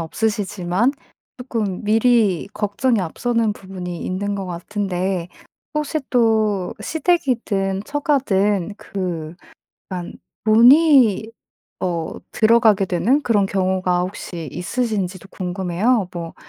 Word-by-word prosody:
없으시지만 205 - 0 0.5
쪼끔 225 -7 -3
미리 215 -4 +3
걱정이 215 +3 0
앞서는 225 +5 0
부분이 185 -3 -7
있는 200 +2 -2
것 195 - -4
같은데 185 0 -3 0.5
혹시 300 +1 -1
또 220 -6 +2
시댁이든 240 - 0
처가든 210 - 0
그 175 -6 -5 0.6
약간 180 -2 -5 0.3
돈이 235 - +6 0.5
어 170 -3 -2 0.2
들어가게 220 -3 +4
되는 230 +11 +2
그런 205 -4 +2
경우가 185 -2 0
혹시 175 -4 -6
있으신지도 195 -3 -3
궁금해요. 185 +4 0
뭐 170 -1 -6
200 Hz, 230 characters per minute, -20 LUFS, 180-230 Hz, 0.6 s, 돈이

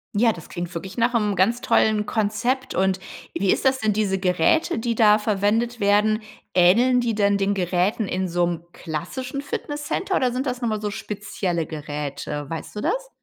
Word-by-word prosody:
Ja 225 +2 +4
das 170 -7 -10
klingt 175 0 -5
wirklich 190 +4 -6
nach 235 +1 +2
'nem 210 -4 +1
ganz 230 +7 +2
tollen 215 -1 +2
Konzept. 230 +5 -1
Und 190 0 +1 0.3
wie 195 -1 +1
ist - - 0
das, 265 0 +3
sind 215 -2 0
diese 195 -3 +1
Geräte 315 - +2
die 230 0 -1
da 210 -1 +6
verwendet 220 +3 0
werden, 210 +2 +3 0.3
ähneln 235 +8 +5
die 235 -2 0
denn 200 -1 +3
den 200 +1 +1
Geräten 185 +3 0
in 185 +1 -1
so 175 0 +2
'nem 170 -1 -3
klassischen 250 - -5
Fitnesscenter 295 +6 -3
oder 255 -6 +2
sind 255 +3 -2
das 250 0 -3
noch 235 - 0
mal 215 -1 -2
so 210 -1 -2
spezielle 195 -5 -3
Geräte? 145 -1 -5
Weißt 165 +4 -6
du 210 - -3
das? - - -1
210 Hz, 185 wpm, -23 LUFS, 185-240 Hz, 0.3 s, da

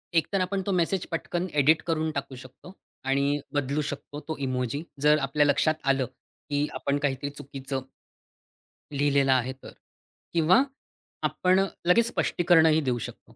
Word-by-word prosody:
एकतर 185 +4 +2
आपण 190 +1 -1
तो 200 - -1
मेसेज 180 0 +1
पटकन 175 +2 -2
एडिट 155 +3 +4
करून 160 -1 0
टाकू 140 -1 -4
शकतो 130 +8 -13 0.3
आणि 140 +2 +1
बदलू 145 +1 0
शकतो 145 0 -6
तो 160 - -2
इमोजी, 130 +1 -2 0.2
जर 150 +1 +5
आपल्या 140 +2 +2
लक्षात 145 +2 +3
आलं, 135 -1 +2
की 145 +4 -5
आपण 140 0 -1
काहीतरी 140 -1 -1
चुकीचं 135 -2 -6 1.1
लिहिलेला 140 -1 +3
आहे 130 +1 0
तर, 135 - -13 0.6
किंवा 170 +9 +5 0.6
आपण 185 +1 +2 0.3
लगेच 230 +6 +5
स्पष्टीकरणही 160 -7 +3
देऊ 125 -4 0
शकतो - - -9
145 Hz, 140 wpm, -27 LUFS, 135-165 Hz, 1.1 s, जर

